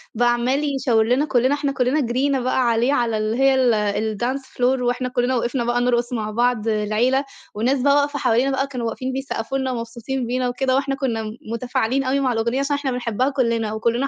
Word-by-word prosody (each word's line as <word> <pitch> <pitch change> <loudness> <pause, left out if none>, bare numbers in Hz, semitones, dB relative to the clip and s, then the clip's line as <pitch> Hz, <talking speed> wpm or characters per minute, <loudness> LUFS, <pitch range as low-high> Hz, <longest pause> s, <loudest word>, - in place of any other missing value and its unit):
بقى 240 +1 +3
عمَال 275 +4 0
يشاور 240 -5 +2
لنا 255 +5 +2
كُلّنا، 260 -1 +2
إحنا 285 -1 -1
كُلّنا 260 +3 +1
جرّينا 265 +3 0
بقى 250 -1 +1
عليه 235 +5 +2
على 230 -4 +1
اللي 215 +2 -1
هي 270 0 +4
ال 215 -3 +1
الdance 260 +3 -1
floor 255 0 0
وإحنا 250 +1 -1
كُلّنا 250 +1 0
وقفنا 240 +1 -1
بقى 240 +1 0
نرقُص 245 0 0
مع 215 -2 -2
بعض 235 -1 0
العيلة 220 +6 +1 0.3
والناس 250 +6 0
بقى 280 +1 +4
واقفة 285 0 +1
حوالينا 245 +5 +2
بقى 270 +1 0
كانوا 245 -4 -4
واقفين 255 +3 -4
بيسقّفوا 270 -1 -3
لنا 260 -1 -1
ومبسوطين 235 +2 -4
بينا 250 0 0
وكده، 260 +1 0
وإحنا 275 0 0
كُنّا 235 -6 -2
م 215 - -5 0.2
مُتفاعلين 245 +2 -1
أوي 270 +1 +1
مع 255 -3 +1
الأغنية 235 +4 0
عشان 280 +1 0
إحنا 285 -2 -2
بنحبّها 250 +1 -1
كُلّنا 230 -5 0
وكُلّنا 235 +5 0
250 Hz, 205 wpm, -21 LUFS, 230-270 Hz, 0.3 s, هي